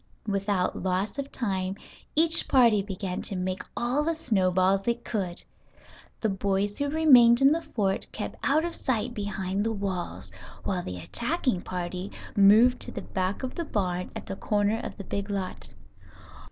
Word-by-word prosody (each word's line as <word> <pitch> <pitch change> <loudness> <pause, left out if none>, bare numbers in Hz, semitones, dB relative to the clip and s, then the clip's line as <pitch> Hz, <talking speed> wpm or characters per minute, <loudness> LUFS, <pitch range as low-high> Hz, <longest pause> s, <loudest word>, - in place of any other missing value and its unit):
Without 200 -2 0
loss 190 +8 -1
of 280 0 -4
time 190 -5 -2 0.4
each 325 +1 +4
party 235 -6 +5
began 190 -2 -4
to 195 - -4
make 185 0 -2 0.2
all 250 +5 +1
the 330 +1 0
snowballs 195 - +2
it 235 0 -1
could. 190 -6 -3 0.8
The 220 - +1
boys 200 +1 -1
who 285 0 0
remained 255 -7 +6
in 275 +1 +6
the 330 +2 +1
fort 195 -10 -1
kept - - -5
out 305 +4 +2
of 345 - -3
sight 245 -1 -1
behind 200 -2 -2
the 225 - 0
walls, 195 -4 -4 0.3
while 185 -2 -1
the 90 - -6
attacking 180 - -1
party 180 +1 -4 0.2
moved 220 +5 +6
to - - -2
the - - -6
back 190 +5 -2
of 255 - -3
the 340 - -3
barn 180 - -2
at - - -6
the - - -5
corner 210 +2 0
of - - -7
the 200 - -6
big 200 +1 -4
lot. 195 -2 -4
205 Hz, 165 wpm, -27 LUFS, 185-245 Hz, 0.8 s, remained